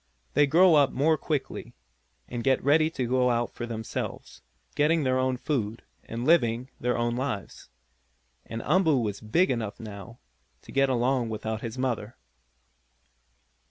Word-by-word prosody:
They 145 Hz, -, +4 dB
grow 170 Hz, +4 st, +6 dB
up 145 Hz, -3 st, +5 dB
more 155 Hz, +4 st, +2 dB
quickly, 150 Hz, -1 st, -4 dB, 0.5 s
and 120 Hz, -1 st, -5 dB
get 135 Hz, -1 st, +2 dB
ready 155 Hz, +3 st, +4 dB
to 130 Hz, -6 st, -3 dB
go 125 Hz, +1 st, +2 dB
about 120 Hz, -1 st, 0 dB
for 120 Hz, -, -5 dB
themselves, 110 Hz, -1 st, -5 dB, 0.3 s
getting 155 Hz, +2 st, +2 dB
their 130 Hz, -1 st, +1 dB
own 130 Hz, 0 st, 0 dB
food, 115 Hz, -6 st, -2 dB, 0.2 s
and 115 Hz, +2 st, -5 dB
living 125 Hz, -6 st, +2 dB
their 125 Hz, 0 st, 0 dB
own 120 Hz, 0 st, 0 dB
lives. 120 Hz, -, -4 dB, 0.8 s
And 115 Hz, 0 st, -5 dB
Umboo 165 Hz, -6 st, +3 dB
was 105 Hz, -4 st, -3 dB
big 150 Hz, -, +2 dB
enough, 110 Hz, -5 st, -3 dB
now, 105 Hz, 0 st, -9 dB, 0.5 s
to -, -, -12 dB
get 135 Hz, 0 st, +2 dB
along 125 Hz, -1 st, +1 dB
without 110 Hz, 0 st, -4 dB
his 115 Hz, +1 st, -6 dB
mother. 125 Hz, -3 st, -2 dB
125 Hz, 150 wpm, -27 LUFS, 115-140 Hz, 0.8 s, grow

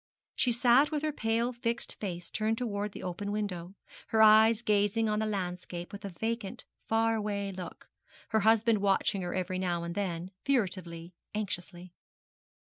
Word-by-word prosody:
She 250 Hz, -, +2 dB
sat 245 Hz, +4 st, +5 dB
with 300 Hz, -1 st, -2 dB
her 310 Hz, -, +1 dB
pale 230 Hz, +1 st, 0 dB
fixed 235 Hz, -1 st, -2 dB
face 175 Hz, -4 st, -5 dB
turned 220 Hz, +1 st, 0 dB
towards 210 Hz, -4 st, -2 dB
the -, -, -7 dB
open 185 Hz, +3 st, -4 dB
window, 195 Hz, -3 st, -3 dB, 0.3 s
her 220 Hz, -, +1 dB
eyes 220 Hz, +1 st, +6 dB
gazing 210 Hz, +1 st, +2 dB
on 210 Hz, 0 st, +1 dB
the 220 Hz, -, 0 dB
landscape 180 Hz, -3 st, -4 dB
with 200 Hz, -, -8 dB
a 200 Hz, -, -4 dB
vacant, 225 Hz, +2 st, -4 dB, 0.2 s
far 225 Hz, 0 st, +2 dB
away 205 Hz, -2 st, -2 dB
look 185 Hz, -2 st, -8 dB, 0.4 s
her 220 Hz, -, +3 dB
husband 225 Hz, +1 st, +4 dB
watching 195 Hz, 0 st, +1 dB
her 175 Hz, -1 st, -3 dB
every 185 Hz, 0 st, -2 dB
now 175 Hz, -2 st, -1 dB
and 170 Hz, 0 st, -4 dB
then, 180 Hz, -2 st, -3 dB
furtively, 180 Hz, -9 st, -1 dB, 0.2 s
anxiously. 180 Hz, -3 st, -4 dB
205 Hz, 160 wpm, -30 LUFS, 185-225 Hz, 0.4 s, eyes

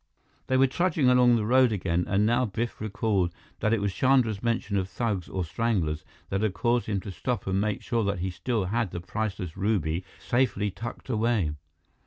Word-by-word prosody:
They 130 Hz, -, +2 dB
were 135 Hz, -, +6 dB
trudging 155 Hz, -1 st, +2 dB
along 125 Hz, -1 st, +6 dB
the 110 Hz, -2 st, 0 dB
road 130 Hz, +1 st, +5 dB
again, 90 Hz, -4 st, 0 dB
and 100 Hz, +2 st, +2 dB
now 120 Hz, +3 st, +3 dB
Biff 115 Hz, +2 st, -4 dB
recalled 100 Hz, -4 st, 0 dB, 0.3 s
that 110 Hz, -, +1 dB
it 115 Hz, -, +3 dB
was 100 Hz, -1 st, -1 dB
Chandra's 125 Hz, -6 st, +2 dB
mention 115 Hz, -3 st, -1 dB
of 95 Hz, -1 st, -1 dB
thugs, 105 Hz, -7 st, -2 dB
or 95 Hz, -2 st, -2 dB
stranglers, 85 Hz, -6 st, -1 dB, 0.3 s
that 95 Hz, +1 st, -1 dB
had 105 Hz, -4 st, 0 dB
caused 120 Hz, +4 st, +1 dB
him 100 Hz, -2 st, 0 dB
to 100 Hz, -, -7 dB
stop 125 Hz, +5 st, -3 dB
and 95 Hz, +1 st, +1 dB
make 105 Hz, 0 st, -1 dB
sure 115 Hz, -2 st, 0 dB
that 100 Hz, -2 st, 0 dB
he 90 Hz, +2 st, -2 dB
still 110 Hz, +3 st, -1 dB
had 115 Hz, +2 st, 0 dB
the 85 Hz, -, -5 dB
priceless 95 Hz, -1 st, -4 dB
ruby 95 Hz, -4 st, 0 dB, 0.2 s
safely 105 Hz, +3 st, +1 dB
tucked 115 Hz, +5 st, -7 dB
away. 110 Hz, -, +1 dB
105 Hz, 195 wpm, -27 LUFS, 95-120 Hz, 0.3 s, were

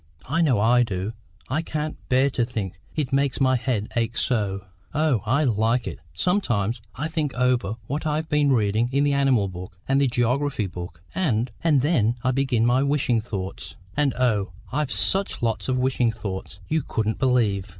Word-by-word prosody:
I 160 Hz, +6 st, +1 dB
know 135 Hz, -10 st, +3 dB
I 120 Hz, +4 st, +4 dB
do; 100 Hz, -2 st, -2 dB, 0.3 s
I 145 Hz, +5 st, 0 dB
can't 155 Hz, -1 st, -3 dB
bear 130 Hz, +2 st, +3 dB
to 125 Hz, -, +1 dB
think; 110 Hz, -6 st, -4 dB, 0.2 s
it 145 Hz, -3 st, -2 dB
makes 140 Hz, -1 st, +1 dB
my 130 Hz, -1 st, +4 dB
head 115 Hz, -4 st, -1 dB
ache 115 Hz, 0 st, 0 dB
so." 105 Hz, -6 st, 0 dB, 0.3 s
"Oh, 150 Hz, -7 st, +2 dB
I 135 Hz, +7 st, +3 dB
like 115 Hz, -1 st, +1 dB
it. -, -, -5 dB, 0.2 s
Sometimes 120 Hz, -, 0 dB
I 150 Hz, +4 st, -2 dB
think 155 Hz, -4 st, -2 dB
over 125 Hz, -4 st, +1 dB
what 150 Hz, +4 st, -3 dB
I've 155 Hz, +1 st, -1 dB
been 150 Hz, -2 st, +3 dB
reading, 110 Hz, 0 st, +2 dB
in 140 Hz, +1 st, +2 dB
the 145 Hz, -1 st, +2 dB
animal 135 Hz, -7 st, +3 dB
book, 90 Hz, -1 st, -8 dB
and 135 Hz, +1 st, +3 dB
the 140 Hz, -, +4 dB
geography 125 Hz, 0 st, 0 dB
book; 90 Hz, -2 st, -8 dB
and 125 Hz, -10 st, 0 dB
and 150 Hz, -5 st, +4 dB
then 120 Hz, -7 st, +2 dB
I 130 Hz, -, +2 dB
begin 130 Hz, -3 st, +1 dB
my 125 Hz, +2 st, +3 dB
wishing 140 Hz, -5 st, +2 dB
thoughts. 100 Hz, -4 st, -6 dB, 0.2 s
And 145 Hz, -2 st, +1 dB
oh, 105 Hz, -7 st, +1 dB, 0.2 s
I've 150 Hz, 0 st, -1 dB
such 195 Hz, -9 st, +1 dB
lots 115 Hz, +2 st, -1 dB
of 130 Hz, -, +1 dB
wishing 125 Hz, -2 st, +2 dB
thoughts, 95 Hz, -4 st, -6 dB
you 160 Hz, 0 st, +1 dB
couldn't 110 Hz, -4 st, -2 dB
believe!" 110 Hz, -7 st, +2 dB
125 Hz, 180 wpm, -24 LUFS, 110-140 Hz, 0.3 s, I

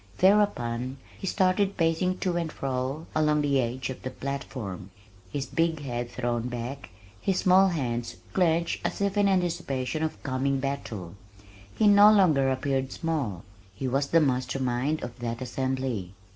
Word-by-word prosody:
Thereupon 130 Hz, -, +2 dB, 0.2 s
he 195 Hz, -, -6 dB
started 190 Hz, +1 st, +2 dB
pacing 170 Hz, +2 st, +1 dB
to 180 Hz, -2 st, 0 dB
and 170 Hz, -2 st, -1 dB
fro 135 Hz, +3 st, -3 dB
along 150 Hz, -1 st, +3 dB
the 140 Hz, -2 st, +2 dB
edge 125 Hz, +2 st, -3 dB
of 130 Hz, -, -8 dB
the 130 Hz, -, -4 dB
platform, 130 Hz, -8 st, -5 dB, 0.4 s
his 140 Hz, +3 st, -2 dB
big 165 Hz, -1 st, 0 dB
head 120 Hz, -2 st, -3 dB
thrown 120 Hz, -1 st, -2 dB
back, 125 Hz, +1 st, -5 dB, 0.3 s
his 190 Hz, -2 st, +1 dB
small 190 Hz, +1 st, +5 dB
hands 120 Hz, -9 st, -2 dB, 0.2 s
clenched 170 Hz, -2 st, +1 dB
as -, -, -2 dB
if 200 Hz, 0 st, 0 dB
in 205 Hz, -1 st, +4 dB
anticipation 165 Hz, -7 st, -1 dB
of 160 Hz, -1 st, -3 dB
coming 135 Hz, +1 st, 0 dB
battle. 115 Hz, -10 st, -4 dB, 0.6 s
He 220 Hz, -, +2 dB
no 205 Hz, +1 st, +8 dB
longer 160 Hz, -10 st, +4 dB
appeared 130 Hz, 0 st, -1 dB
small. 140 Hz, -, -2 dB, 0.3 s
His 130 Hz, +6 st, -2 dB
was 140 Hz, +2 st, +1 dB
the 165 Hz, -, +4 dB
master 130 Hz, -2 st, 0 dB
mind 130 Hz, +4 st, 0 dB
of 120 Hz, +1 st, -7 dB
that 115 Hz, -1 st, -3 dB
assembly. 130 Hz, -6 st, -3 dB
135 Hz, 155 wpm, -27 LUFS, 125-170 Hz, 0.6 s, no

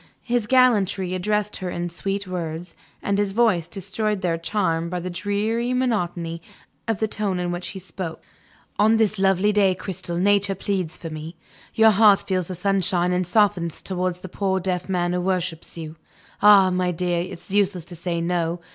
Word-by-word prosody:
His 240 Hz, -3 st, 0 dB
gallantry 205 Hz, -7 st, +3 dB
addressed 210 Hz, +3 st, -1 dB
her 185 Hz, -1 st, -4 dB
in 175 Hz, 0 st, -3 dB
sweet 195 Hz, +4 st, -3 dB
words; 170 Hz, -1 st, -5 dB, 0.3 s
and 200 Hz, 0 st, 0 dB
his 200 Hz, -1 st, 0 dB
voice 205 Hz, -8 st, +2 dB
destroyed 205 Hz, +1 st, -2 dB
their 175 Hz, -3 st, +1 dB
charm 165 Hz, -1 st, -1 dB
by 180 Hz, 0 st, -3 dB
the 180 Hz, +1 st, -5 dB
dreary 215 Hz, +6 st, -1 dB
monotony 175 Hz, -9 st, -1 dB, 0.5 s
of 225 Hz, -2 st, 0 dB
the 220 Hz, -, 0 dB
tone 205 Hz, -3 st, -1 dB
in 175 Hz, 0 st, -1 dB
which 175 Hz, 0 st, -4 dB
he 195 Hz, -, -6 dB
spoke. 180 Hz, -2 st, -6 dB, 0.6 s
"On 220 Hz, +2 st, +5 dB
this 215 Hz, -2 st, +1 dB
lovely 195 Hz, +1 st, +3 dB
day, 200 Hz, -3 st, +3 dB
Cristel, 180 Hz, -2 st, -5 dB
Nature 200 Hz, +1 st, +2 dB
pleads 185 Hz, -3 st, -2 dB
for 165 Hz, -2 st, -7 dB
me. 155 Hz, +2 st, -7 dB, 0.4 s
Your 220 Hz, -1 st, +6 dB
heart 205 Hz, -1 st, +6 dB
feels 185 Hz, -3 st, 0 dB
the 185 Hz, -, -5 dB
sunshine 180 Hz, -1 st, +1 dB
and 180 Hz, -1 st, 0 dB
softens 185 Hz, -4 st, +2 dB
towards 185 Hz, -1 st, -2 dB
the 185 Hz, -, -7 dB
poor 190 Hz, +1 st, -1 dB
deaf 180 Hz, 0 st, -2 dB
man 175 Hz, -1 st, 0 dB
who 180 Hz, -, 0 dB
worships 180 Hz, -3 st, -2 dB
you. 160 Hz, -1 st, -7 dB, 0.4 s
Ah, 200 Hz, -2 st, +7 dB
my 180 Hz, 0 st, +1 dB
dear, 175 Hz, 0 st, 0 dB
it's 175 Hz, +1 st, -8 dB
useless 195 Hz, -4 st, +1 dB
to 175 Hz, -, -9 dB
say 170 Hz, 0 st, -3 dB
No. 170 Hz, 0 st, -1 dB
185 Hz, 180 wpm, -23 LUFS, 175-205 Hz, 0.6 s, Ah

